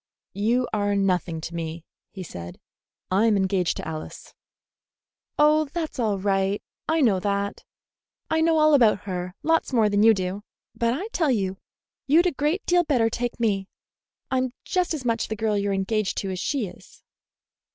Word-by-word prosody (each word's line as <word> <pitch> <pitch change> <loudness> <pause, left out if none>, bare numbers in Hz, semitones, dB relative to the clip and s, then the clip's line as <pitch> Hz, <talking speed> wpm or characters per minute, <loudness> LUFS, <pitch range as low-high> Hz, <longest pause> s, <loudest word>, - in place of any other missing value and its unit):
"You 230 +5 +1
are 205 -1 +1
nothing 180 -4 0
to 165 - -6
me," 165 -1 -5 0.2
he 190 - -8
said. 85 - -9 0.5
"I 200 +5 +3
am 215 -2 +3
engaged 190 -2 +1
to - - -6
Alice." 155 -1 -7 1.0
"Oh, 305 +1 +4
that's 315 -1 -5
all 215 -4 +1
right. 195 0 0 0.3
I 320 0 +2
know 215 -8 +3
that. 200 +1 -2 0.6
I 320 0 +1
know 325 0 +3
all 310 0 +5
about 225 -7 +5
her; 180 -2 -5
lots 325 -1 +2
more 225 -4 +3
than 205 0 +2
you 225 0 +6
do. 185 +1 -3 0.3
But 235 +1 0
I 375 +9 -4
tell 330 -9 0
you, 195 -5 0 0.5
you'd 320 +6 +5
a 360 - +3
great 300 +7 -1
deal 350 0 +3
better 245 -8 +2
take 245 +1 -3
me. 200 -4 0 0.6
I'm 255 -1 0
just 360 -3 0
as 270 -5 -7
much 230 -1 0
the 220 - -3
girl 215 0 0
you're 200 0 0
engaged 195 +1 -1
to 195 - -2
as 185 - -4
she 265 +4 -1
is." 180 - -14
215 Hz, 175 wpm, -25 LUFS, 195-275 Hz, 1.0 s, you